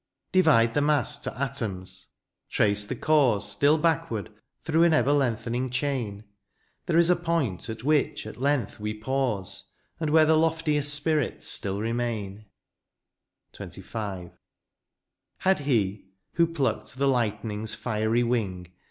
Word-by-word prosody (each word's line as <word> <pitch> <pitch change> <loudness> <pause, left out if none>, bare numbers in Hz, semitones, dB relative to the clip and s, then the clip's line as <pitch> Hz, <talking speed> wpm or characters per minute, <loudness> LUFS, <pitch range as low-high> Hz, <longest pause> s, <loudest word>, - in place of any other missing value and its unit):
Divide 145 -11 +4
the 145 - +2
mass 145 -3 +2
to - - -6
atoms 115 -10 -4 0.2
— - - -44
^trace 105 0 +1
the 130 - -3
cause 125 -7 +2
Still 145 +9 +3
backward 165 -10 -1 0.3
through 160 +1 +2
an 170 -1 +5
ever 145 -2 +3
lengthening 125 -2 0
chain^ 125 -6 -2 0.6
There 170 -2 +2
is 170 +1 +5
a - - +5
pomt 165 - -2
at 110 0 -6
which 145 -5 +1
at 110 +3 -9
length 140 -4 0
we 105 +1 -3
pause, 110 -5 -2 0.3
And 160 -2 -1
where 155 +1 +5
the 155 0 +4
loftiest 155 -3 +1
spirits 145 -1 0
still 100 0 -2
remain. 110 -3 -3 1.1
XXV. 95 -6 -6 1.1
Had 190 -2 +2
he* 105 -9 0 0.3
who 170 0 +3
plucked 145 -5 -2
the 140 +1 +1
lightening's 110 -3 -1
fiery 110 0 0
wing. 95 -7 -2
125 Hz, 135 wpm, -26 LUFS, 105-150 Hz, 1.1 s, an